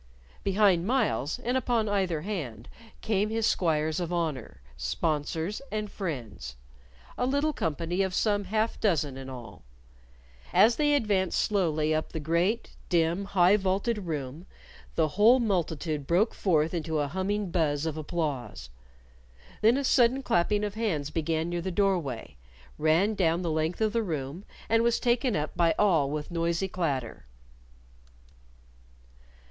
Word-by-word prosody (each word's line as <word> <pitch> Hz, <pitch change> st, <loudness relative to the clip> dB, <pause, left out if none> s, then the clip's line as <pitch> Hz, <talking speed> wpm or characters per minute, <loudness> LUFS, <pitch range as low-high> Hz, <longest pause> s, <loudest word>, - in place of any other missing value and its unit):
Behind 195 Hz, -3 st, +3 dB
Myles, 210 Hz, -, 0 dB
and 245 Hz, +2 st, -2 dB
upon 240 Hz, -3 st, +1 dB
either 190 Hz, -6 st, 0 dB
hand, 145 Hz, -, -5 dB, 0.3 s
came 210 Hz, -1 st, 0 dB
his 225 Hz, 0 st, 0 dB
squires 160 Hz, -4 st, +1 dB
of 175 Hz, -1 st, -3 dB
honor, 160 Hz, -8 st, -3 dB, 0.2 s
sponsors, 155 Hz, -, -2 dB
and 215 Hz, -1 st, -3 dB
friends 120 Hz, -, -5 dB, 0.6 s
a 250 Hz, -, +1 dB
little 285 Hz, +3 st, +1 dB
company 165 Hz, -, -2 dB
of 190 Hz, -1 st, -1 dB
some 205 Hz, -2 st, +1 dB
half 215 Hz, +3 st, -1 dB
dozen 155 Hz, -9 st, +1 dB
in 135 Hz, 0 st, -8 dB
all. 115 Hz, -, -10 dB, 0.9 s
As 230 Hz, +2 st, +5 dB
they 295 Hz, -1 st, +3 dB
advanced 200 Hz, -8 st, +1 dB
slowly 160 Hz, -7 st, +1 dB
up 155 Hz, 0 st, -2 dB
the 160 Hz, -, -3 dB
great, 170 Hz, +9 st, 0 dB, 0.2 s
dim, 170 Hz, +2 st, +1 dB
high 195 Hz, 0 st, +4 dB
vaulted 200 Hz, +1 st, -1 dB
room, 150 Hz, +2 st, -5 dB, 0.5 s
the 160 Hz, -2 st, +2 dB
whole 220 Hz, -, +5 dB
multitude 160 Hz, -, -1 dB
broke 190 Hz, +7 st, +2 dB
forth 160 Hz, -4 st, +1 dB
into 160 Hz, -2 st, -2 dB
a 145 Hz, -1 st, 0 dB
humming 190 Hz, +4 st, -2 dB
buzz 155 Hz, -3 st, 0 dB
of 160 Hz, -2 st, -2 dB
applause. 145 Hz, -, -4 dB, 0.9 s
Then 230 Hz, +4 st, +5 dB
a 280 Hz, -, -1 dB
sudden 255 Hz, 0 st, +3 dB
clapping 210 Hz, -1 st, +1 dB
of 205 Hz, -1 st, -2 dB
hands 175 Hz, -10 st, -2 dB
began 160 Hz, 0 st, -1 dB
near 175 Hz, 0 st, -2 dB
the 190 Hz, -, -3 dB
door 195 Hz, 0 st, +2 dB
way, 125 Hz, -, -7 dB, 0.4 s
ran 165 Hz, +8 st, +3 dB
down 175 Hz, -4 st, +1 dB
through -, -, -5 dB
the 170 Hz, -, -1 dB
length 160 Hz, +5 st, -1 dB
of 215 Hz, -1 st, +1 dB
the 230 Hz, -, +2 dB
room, 160 Hz, -1 st, -4 dB, 0.2 s
and 225 Hz, +1 st, +3 dB
was 235 Hz, 0 st, +2 dB
taken 240 Hz, -1 st, +1 dB
up 150 Hz, +3 st, -2 dB
by 170 Hz, -1 st, +3 dB
all 165 Hz, -9 st, +3 dB
with 150 Hz, +3 st, -4 dB
noisy 170 Hz, +2 st, 0 dB
clatter. 140 Hz, -, -3 dB
175 Hz, 150 wpm, -28 LUFS, 155-210 Hz, 0.9 s, As